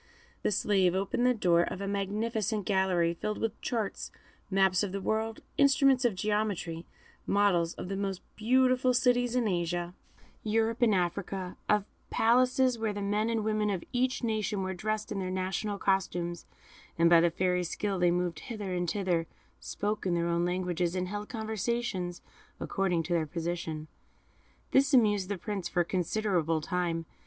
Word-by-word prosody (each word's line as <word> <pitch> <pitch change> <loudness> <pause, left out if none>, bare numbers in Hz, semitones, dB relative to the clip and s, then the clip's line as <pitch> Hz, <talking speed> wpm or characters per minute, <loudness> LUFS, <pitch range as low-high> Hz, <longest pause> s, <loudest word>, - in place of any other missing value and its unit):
The - - +1
slave 190 -3 +2
opened 200 +6 +1
the 250 - +4
door 175 -5 +3
of 180 +2 -3
a 200 - -3
magnificent 210 +1 -1
gallery, 185 -4 +2
filled 210 +5 -3
with 225 -1 -3
charts, 225 -5 -3 0.4
maps 190 -2 +3
of 200 -3 -2
the 200 - -2
world, 220 +3 -2 0.2
instruments 275 -2 +4
of 230 -5 +2
geometry, 200 -5 -2 0.4
models 185 -5 +2
of - - -6
the 195 - -3
most 195 -2 -3
beautiful 255 +2 +3
cities 245 0 +2
in 245 -3 +2
Asia, 175 -1 -1 0.5
Europe, 225 +2 0
and 225 -4 +4
Africa; 185 +1 -2
of 210 -1 +3 0.2
palaces 250 +1 +3
where 220 -2 -1
the 205 - -4
men 210 +3 0
and 225 -2 0
women 215 -1 0
of 190 -4 -2
each 250 +1 0
nation 215 -3 -1
were 190 0 -2
dressed 215 +3 -3
in 200 - -2
their 185 -1 -3
national 190 +3 -2
costumes, 175 -3 -1 0.5
and 170 0 +5
by 170 -1 +7
the 170 - +4
Fairy's 180 0 0
skill 200 -3 -2
they 175 0 +4
moved 175 -1 -1
hither 205 -5 -5
and 175 -1 -1
thither, 180 -5 0 0.3
spoke 210 -1 -3
in 175 - +1
their 170 0 0
own 170 0 +1
language, 180 0 -1
and 185 0 -2
held 205 +1 -5
conversations 220 -5 -3 0.4
according 180 -4 0
to 175 - -2
their 160 -2 +1
position. 165 -1 -4 0.8
This 275 +1 +4
amused 205 -5 +3
the 200 - -2
Prince 195 -1 -4
for 175 - +1
a - - 0
considerable 180 -3 0
time. 165 0 -2
195 Hz, 165 wpm, -30 LUFS, 175-220 Hz, 0.8 s, by